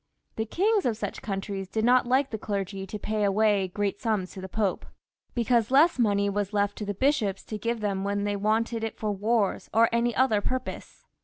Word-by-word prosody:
The 220 0 -2
kings 400 - +2
of 225 -3 -1
such - - -5
countries 195 -1 -4
did 220 +2 0
not 250 0 +4
like 265 +2 +2
the 220 - -4
clergy 195 -2 -4
to~pay 210 +1 -2
away 205 -1 +2
great 200 +2 -2
sums 210 -6 -1
to 190 - -9
the 190 - -7
popes, 205 -2 -1 0.5
because 235 -2 +2
less 280 +3 +4
money 200 -3 +2
^as"^ 200 0 -2
left 205 0 0
for 210 - -3
the 205 0 -3
bishops 230 -6 +1
to 215 - -6
give 230 +1 -2
them 195 -2 -1
when 200 0 -1
thejr 205 0 -1
wanted 220 +2 0
it 225 - -4
for 215 -1 -2
wars 205 +1 0
or 225 +1 +4
any 235 0 +1
other 230 -5 +3
purpose. 255 +4 -5
215 Hz, 205 wpm, -27 LUFS, 200-235 Hz, 0.5 s, not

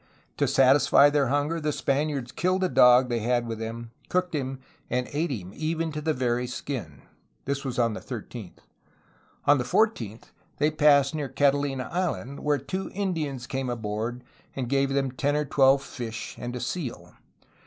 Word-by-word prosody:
To - - +2
satisfy 135 +2 +5
their 145 -2 +2
hunger 145 +5 0
the 150 0 0
Spaniards 140 -3 -1
killed 185 +2 0
a 185 - +2
dog 125 -2 +6
they 120 -1 -1
had 120 +2 +1
with 115 -1 -5
them, 115 +1 -6 0.2
cooked 180 -1 0
him, 135 -3 -2 0.3
and 125 0 -1
ate 160 +4 0
him, 95 -9 -5
even 160 +1 -2
to 150 0 -4
the 160 +1 0
very 125 -2 0
skin. 120 - -6 0.4
This 140 0 -2
was 130 -3 -4
on 115 -2 +2
the - - -5
13th. 115 -5 -8 0.8
On 145 -1 +5
the - - 0
14th 120 - 0 0.3
they 150 +2 +2
passed 145 -2 +4
near 150 -3 -3
Catalina 140 -1 +1
Island, 140 - -2
where 150 -1 +1
two 185 +9 -4
Indians 160 -10 -2
came 130 0 -3
aboard 115 +1 -3 0.3
and 130 -3 -3
gave 135 +1 +2
them 135 -1 0
ten 145 +3 0
or 150 0 0
twelve 135 0 +4
fish 115 -4 -6
and 120 0 -5
a - - -3
seal. 120 - -5
135 Hz, 175 wpm, -26 LUFS, 120-150 Hz, 0.8 s, dog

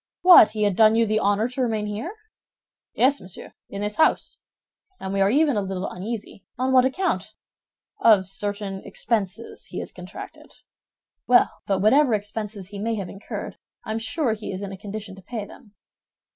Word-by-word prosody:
"What, 360 - +9
he 215 -1 -1
had 205 -3 +2
done 220 +1 +6
you 230 0 +4
the 215 0 +1
honor 205 +2 +2
to 255 +1 -4
remain 220 -4 0
here?" 220 - -5 0.8
"Yes, 275 +3 +3
monsieur, 185 -1 -10 0.2
in 200 - -6
this 210 0 -3
house; 315 - +2 0.6
and 190 0 -5
we 195 - +1
are 195 - +4
even 290 +2 +3
a - - +1
little 190 0 -3
uneasy—" 200 +1 -6
"On 260 +2 0
what 255 -1 +6
account?" 370 +9 -1 0.6
"Of 205 -5 +5
certain 200 0 -4
expenses 215 +1 -3
he - - -8
has - - -5
contracted." - - -10 0.7
"Well, 245 0 +5 0.2
but 195 -2 +1
whatever 255 +2 +5
expenses 205 -2 -5
he 200 -1 -8
may 225 +2 -1
have 195 -4 -5
incurred, 195 - -7 0.3
I - - -4
am 220 - -1
sure 230 +2 -1
he 215 -1 -6
is 190 +1 -5
in 195 - -5
a - - -6
condition 205 +1 -7
to - - -12
pay 215 +1 -5
them." 215 -2 -16
215 Hz, 185 wpm, -24 LUFS, 200-235 Hz, 0.8 s, What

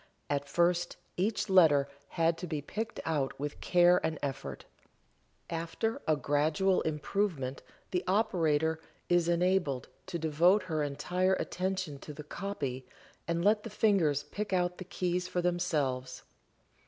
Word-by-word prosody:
At 140 0 -1
first 175 +2 +1 0.2
each 205 +4 0
letter 160 -8 +5 0.3
had 165 0 +3
to 180 - -5
be 155 -3 -2
picked 220 +10 -5
out 145 -5 -1
with 145 +1 -4
care 175 0 +4
and 160 -1 -1
effort. 135 -1 -4 0.8
After 170 +7 -2
a 155 - +4
gradual 155 +7 +2
improvement 150 -3 -1 0.3
the 180 -1 0
operator 160 -6 +2 0.3
is 175 -1 +3
enabled 175 -6 +1 0.2
to 185 -2 -3
devote 170 +5 +3
her 160 -4 -2
entire 180 +6 +1
attention 185 -6 -2
to 150 - -9
the 150 +1 -8
"copy" 145 -8 -4 0.4
and 170 +1 0
let 210 +1 +4
the 230 - -7
fingers 185 -10 +2
pick 210 +5 -5
out 180 -1 0
the 185 - -6
keys 180 -1 -1
for 180 - -2
themselves. 145 -8 -1
170 Hz, 140 wpm, -31 LUFS, 145-185 Hz, 0.8 s, letter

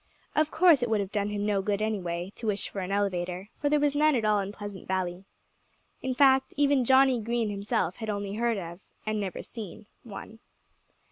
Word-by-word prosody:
Of 310 0 +3
course 325 -5 +5
it 245 - 0
would 220 -1 +2
have 200 -1 -3
done 205 0 0
him 205 0 -2
no 205 -2 +1
good, 200 0 -1
anyway, 190 -4 -2
to 230 - -5
wish 205 -1 0
for 200 - -5
an 185 0 -4
elevator, 185 -1 -1
for 290 - +1
there 300 0 +3
was 290 -1 +2
none 305 0 +4
in 225 -3 0
all 210 -2 +3
Pleasant 205 -2 -8
Valley. 185 0 -2 0.8
In 260 -1 -2
fact, 265 -1 +4
even 285 -2 +3
Johnnie 260 -1 +5
Green 230 -1 -1
himself 200 -2 -1
had 220 -2 -5
only 200 -1 -3
heard 230 +1 0
of 175 0 -7 0.2
and 215 0 -1
never 190 -2 -4
seen 215 -2 -9 0.2
one. 220 0 -9
210 Hz, 200 wpm, -28 LUFS, 195-245 Hz, 0.8 s, course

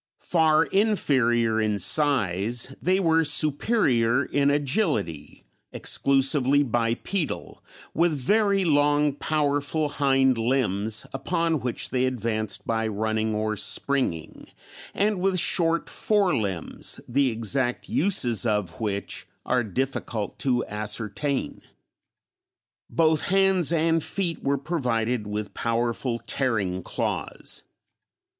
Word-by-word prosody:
Far 160 -2 +2
inferior 125 - +1
in 105 -1 0
size, 120 - +1
they 185 +2 +2
were 165 -3 +3
superior 145 - +1
in 140 0 +1
agility, 145 - -1 0.3
exclusively 140 +1 +3
bipedal, 120 - -2 0.3
with 170 +1 +2
very 200 - +1
long, 145 -1 +2
powerful 145 +1 -1
hind 135 -3 +2
limbs, 110 -3 0
upon 165 +3 -1
which 125 -2 -3
they 130 0 +1
advanced 110 -4 -2
by 115 -1 -1
running 110 +1 -1
or 110 0 -1
springing, 115 - -1 0.5
and 205 -1 +1
with 190 -1 +1
short 165 -1 +2
fore 200 -6 +1
limbs, 95 -7 -2
the 135 +2 +2
exact 120 +2 -1
uses 145 - +2
of 105 -5 -2
which 100 -2 -3 0.2
are 125 -1 +1
difficult 115 -1 -3
to 125 -3 0
ascertain. 105 +6 -3 1.3
Both 160 -2 +2
hands 190 -3 +2
and 165 -1 +1
feet 175 -5 -2
were 140 +1 +1
provided 125 -7 -2
with 105 0 -4
powerful 115 +1 -1
tearing 100 -9 -1
claws. - - -4
135 Hz, 105 wpm, -25 LUFS, 110-155 Hz, 1.3 s, were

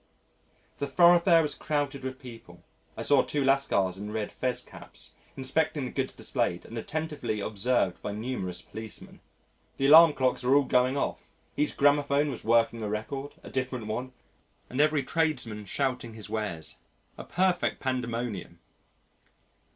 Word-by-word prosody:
The 140 - -1
thoroughfare 170 +2 +6
was 150 - -2
crowded 145 -3 -2
with 130 0 -4
people 115 -10 -12 0.3
(I - - -3
saw - - +5
two 145 -2 -1
Lascars 100 -9 +2
in 105 +1 -6
red 110 -1 -3
fez 130 -1 -2
caps) - - -11 0.2
inspecting 145 +2 0
the 125 - -5
goods 135 -1 -2
displayed 85 0 -2
and 115 - -10
attentively 145 -4 -3
observed 100 -2 0
by 105 - -4
numerous 105 -5 -4
policemen. 110 -1 -10 0.6
The 135 - 0
alarm 160 +2 +9
clocks 130 -2 0
were 125 +2 +3
all 145 - +5
going 130 +1 +2
off, - - -3 0.3
each 150 - -1
gramophone 145 0 +3
was 125 - -8
working 115 0 +2
a 105 - -2
record 135 +7 -4
(a - - -10
different 130 -3 -3
one!) 125 +4 -4 0.6
and 130 +3 +1
every 150 -2 +3
tradesman 130 -10 -1
shouting 125 0 -2
his 110 - -7
wares 105 -8 -3 0.4
a - - -8
perfect 185 0 +1
pandemonium. 115 -8 -3
130 Hz, 150 wpm, -28 LUFS, 110-145 Hz, 0.6 s, alarm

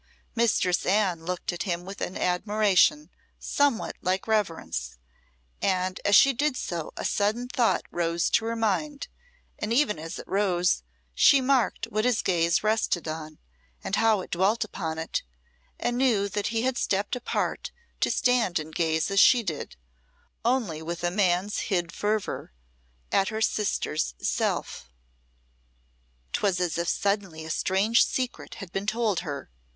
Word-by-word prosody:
Mistress 220 -6 +2
Anne 185 -4 +1
looked 180 0 -3
at 175 - -5
him 175 -2 -2
with 195 +1 -8
an 185 - -3
admiration 210 +9 +2 0.3
somewhat 285 -5 0
like 185 +1 0
reverence, 160 - -1 0.6
and 185 -1 0
as 205 - +4
she 275 +6 +7
did 285 +1 0
so 170 -3 -4
a - - -4
sudden 215 +4 0
thought 245 -2 +1
rose 170 0 0
to 225 - +2
her 230 0 -1
mind, 255 +7 -1 0.5
and 210 - -3
even 235 - +2
as 165 +2 -6
it - - -9
rose, 180 - +1 0.3
she 275 - +6
marked 260 -2 +1
what 215 +1 -2
his 245 -2 +1
gaze 170 -1 +2
rested 215 -6 0
on, 155 -1 -6 0.5
and - - -1
how 220 -3 +3
it - - -10
dwelt 195 +7 +2
upon 160 -6 -4
it, 160 - -2 0.6
and 240 0 -1
knew 225 -7 +3
that 200 +1 -2
he 225 0 -1
had 260 0 0
stepped 200 +4 0
apart 250 - -2 0.3
to - - +2
stand 245 -8 +2
and 155 0 -5
gaze 160 +2 0
as 195 - +3
she 240 +3 +6
did 160 -7 -5 0.7
only 230 -10 0
with 170 +2 -5
a 175 - +1
man's 190 +1 +1
hid 175 -4 0
fervour 210 - -2 0.6
at 195 - +3
her 220 - -3
sister's 200 - 0
self. 60 - -2 1.4
'Twas 190 -3 +1
as 175 -2 -1
if 170 0 0
suddenly 195 -6 -1
a 160 - -4
strange 200 +8 +3
secret 255 -2 -3
had 195 -5 -9
been 195 +1 -3
told 215 -4 +1
her. 145 - -6
195 Hz, 155 wpm, -26 LUFS, 175-225 Hz, 1.4 s, she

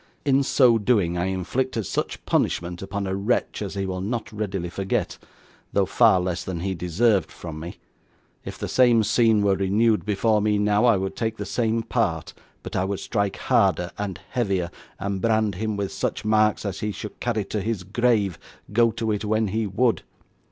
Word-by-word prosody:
In 140 -1 +4
so 125 -4 +4
doing, 100 -6 +2
I 90 0 0
inflicted 100 +5 -2
such - - -3
punishment 85 0 0
upon 100 +1 -4
a 95 0 -2
wretch 105 +4 -1
as 100 -1 -4
he 100 -1 -1
will 95 -1 -3
not 115 +4 -3
readily 95 -5 -3
forget, 95 +1 -2 0.5
though - - +3
far 95 - +4
less 90 -1 -2
than 90 -3 -4
he 95 +1 -1
deserved 95 +4 +1
from 80 -3 -8
me. 85 +2 -8 0.7
If - - -7
the - - -4
same 120 -3 +4
scene 110 -1 +3
were 100 -1 +3
renewed 105 +4 +2
before 105 +1 +1
me 105 0 +2
now, 105 +2 +2
I 115 -4 +5
would 95 0 -3
take 110 -1 -2
the - - -4
same 115 -1 0
part; - - -1 0.3
but - - -7
I 95 - +1
would 95 0 -2
strike 100 -3 -1
harder 90 +1 +2
and 100 -3 -4
heavier, 95 -8 -1 0.3
and 100 -1 -3
brand 110 -2 +2
him 110 +2 -3
with 100 -1 -2
such 95 +2 -3
marks 110 0 +2
as 100 -2 -3
he 105 - -2
should 105 +1 -8
carry 110 -4 -1
to 105 +1 -3
his 110 -3 -2
grave, 105 -2 +1 0.3
go 115 +1 +5
to 115 -1 -2
it 105 0 -2
when 110 0 +1
he 110 +2 -1
would. 115 +5 +1
105 Hz, 190 wpm, -24 LUFS, 95-110 Hz, 0.7 s, I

